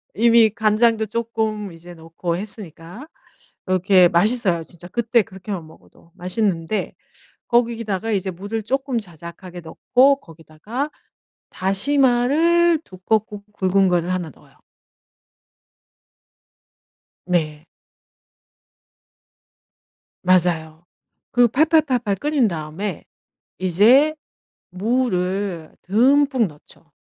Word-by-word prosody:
이미 230 0 +5
간장도 220 +1 +2
쪼끔 220 -2 -3
이제 170 +2 -13
넣고 165 +1 -5
했으니까 200 - -9 0.6
이렇게 185 -1 +4
맛있어요. 185 -1 +2
진짜 175 +1 -13
그때 235 +3 +1
그렇게만 190 -3 -8
먹어도 160 +1 -20
맛있는데 180 0 -2 0.5
거기다가 230 -3 0
이제 195 -3 -1
물을 200 +5 -5
쪼끔 265 +2 -2
자작하게 175 -1 -10
넣고 255 +11 +2
거기다가 165 - -7 0.6
다시마를 280 - +2
두껍고 205 +2 -2
굵은 190 -1 +2
거를 175 0 0
1 180 -3 -3
넣어요. - - -22 2.7
네. 160 -3 -2 2.6
맞아요. 170 -3 +1 0.5
그 245 0 +4
팔팔 310 +7 +3
팔팔 245 -8 -1
끓인 285 +2 +1
다음에 170 +2 -5 0.5
이제 225 - +4 0.6
무를 190 -5 -2
듬뿍 260 +5 +3
넣죠. 150 -3 -18
200 Hz, 205 characters per minute, -21 LUFS, 175-235 Hz, 2.7 s, 이미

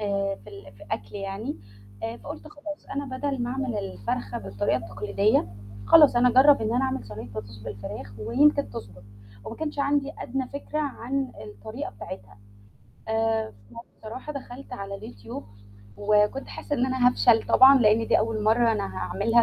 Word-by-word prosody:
آآ 200 -1 0
في - - -12
ال 100 +3 -12
ف 100 - -17
أكل 100 0 -4
يعني، 195 - -4 0.5
آآ 225 +1 -3
فقُلت 305 +3 -9
خلاص 300 0 -9
أنا 275 -2 -3
بدل 275 -2 -2
ما 240 - -2
أعمل 260 -4 -2
الفرخة 100 +2 -3
بالطريقة 100 +4 -1
التقليدية، 110 - +1 0.4
خلاص 300 -6 +8
أنا 250 +1 +6
أجرب 265 +1 +6
إن 220 +2 0
أنا 255 +2 +2
أعمل 265 0 -2
صينية 105 +2 -8
بطاطس 105 -1 -8
بالفراخ 100 -1 -7
ويمكن 285 - +3
تضبط، 100 +2 -9 0.4
وما 230 - -7
كانش 300 -2 -4
عندي 280 0 +1
أدنى 260 0 -3
فكرة 285 +2 -5
عن 270 -2 -2
الطريقة 105 +1 -7
بتاعتها. 95 -1 -10 0.7
آآ 225 0 +1 0.2
فبصراحة 235 +4 -9
دخلت 270 -2 -9
على 200 -4 -5
الYouTube 110 -4 -8 0.5
وكنت 210 +5 +2
حاسة 290 - -4
إن 250 - +2
أنا 260 -1 +4
هافشل 240 -2 +4
طبعًا 270 +1 +8
لأن 225 -1 +4
دي - - +4
أول 220 -1 -1
مرّة 225 +1 +4
أنا 200 -3 -3
هاعملها 230 +3 +2
225 Hz, 160 wpm, -26 LUFS, -, 0.7 s, خلاص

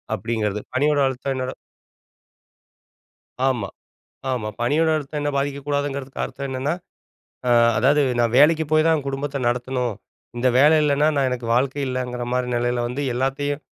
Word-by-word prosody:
அப்டிங்கிறது. 105 -3 -2
பணியோட 145 +2 +2
அழுத்தம் 135 +1 -3
என்னோட 130 0 -3 1.9
ஆமா, 120 -7 0 0.7
ஆமா. 110 -4 -2
பணியோட 155 +7 +2
அழுத்தம் 150 0 -4
என்ன 145 0 0
பாதிக்கக் 140 0 -2
கூடாதுங்கறதுக்கு 140 -2 -2
அர்த்தம் 140 0 -6
என்னன்னா, 135 +5 -1 0.7
ஆ - - +3 0.3
அதாது 140 +6 +4 0.2
நான் 120 0 +1
வேலைக்குப் 155 +1 +4
போய் 155 +1 +4
தான் 155 -3 +2
குடும்பத்தை 140 +1 -3
நடத்தணும். 125 -1 -1 0.4
இந்த 130 +1 +2
வேலை 150 +3 +6
இல்லன்னா 150 +1 +3
நான் 135 -2 +2
எனக்கு 125 -2 -4
வாழ்க்கை 135 +3 +1
இல்லைங்கிற 125 -1 -3
மாரி 125 0 0
நிலையில 120 0 0
வந்து 135 +4 -3
எல்லாத்தையும், 135 +3 -1
135 Hz, 140 wpm, -22 LUFS, 125-145 Hz, 1.9 s, வேலை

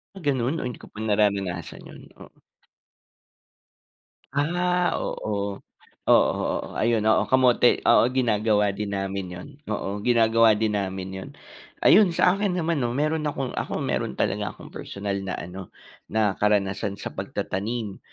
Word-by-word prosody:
Ah - - -9
ganun, 140 -1 0
o - - -4
hindi 125 - -5
ko - - -10
pa 105 - -11
nararanasan 100 -5 -1
'yun - - -12 0.2
oo. - - -15 1.9
Ah 175 +4 +1
oo, 100 -2 -3 0.5
oo, - - +5
oo, - - -2
ayun 115 -1 +2
oo, 110 0 +3
kamote 125 -2 +4
oo 120 - +5
ginagawa 105 -4 +2
din 100 0 -4
namin 95 0 -3
'yun 90 +7 -8 0.2
oo 105 -1 -3
ginagawa 115 -2 +5
din 110 0 0
namin 95 -1 -4
y'un, 95 0 -7 0.5
ayun 190 -5 +6
sa 180 - +5
akin 195 -1 0
naman 165 -3 0
'no 120 0 -1
meron 155 +1 0
akong 135 -3 -3
ako - - -3
meron 65 - -2
talaga - - -1
akong - - -13
personal 100 0 -4
na 95 -1 -4
ano 90 +2 -8 0.4
na 110 -2 +1
karanasan 100 -1 +1
sa - - -6
pagtatanim 105 +1 -4
110 Hz, 145 wpm, -25 LUFS, 100-130 Hz, 1.9 s, ayun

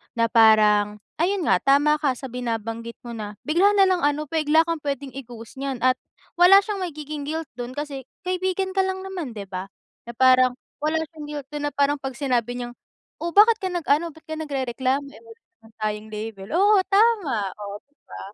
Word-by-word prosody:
na 230 0 +2
parang, 210 -2 +5 0.2
ayun 365 0 +1
nga - - +5
tama 290 +2 +4
ka 280 -4 +1
sa 265 +1 -8
binabanggit 230 -1 -4
mo 240 - -9
na 210 -2 -6
bigla 365 +7 +3
nalang 380 -3 +4
ano 295 0 0
bigla 315 0 +3
kang 335 -1 -1
pwede 280 -1 -3
i-ghost 240 -2 -10
niyan 270 -3 -4
at 255 0 +4 0.4
wala 390 +3 +8
siyang 415 -3 -3
magiging 300 -2 -6
guilt 320 -2 -4
dun 245 +1 -5
kasi 285 -3 -5 0.2
kaibigan 375 +1 -1
ka 380 - +4
lang 380 0 -3
naman, 350 -11 -5
'di 200 - -6
ba? 185 0 -5 0.4
Na 235 - -7
parang 255 -1 +5 0.3
wala 320 +1 +1
siyang 300 -2 -8
guilt 290 -2 -6
doon 295 0 -4
na - - -23
parang 285 +1 +2
'pag 270 -1 -5
sinabi 245 -3 -1
niyang, 240 0 -6 0.5
"Oh, 340 0 -3
bakit 440 +2 +6
ka 375 - -1
nag-ano, 330 -1 0
ba't 320 - -17
ka 315 - -4
nagrereklamo, 270 -2 -1
eh, 285 - -15
wala 460 0 -15
naman 225 -12 -23
tayong 210 0 -2
label." 210 -2 -6
Oo 405 +3 +5
tama, 390 - +2
oh, 205 -1 -7
'di 290 - -40
ba? 95 - -10
280 Hz, 195 wpm, -23 LUFS, 235-335 Hz, 0.5 s, wala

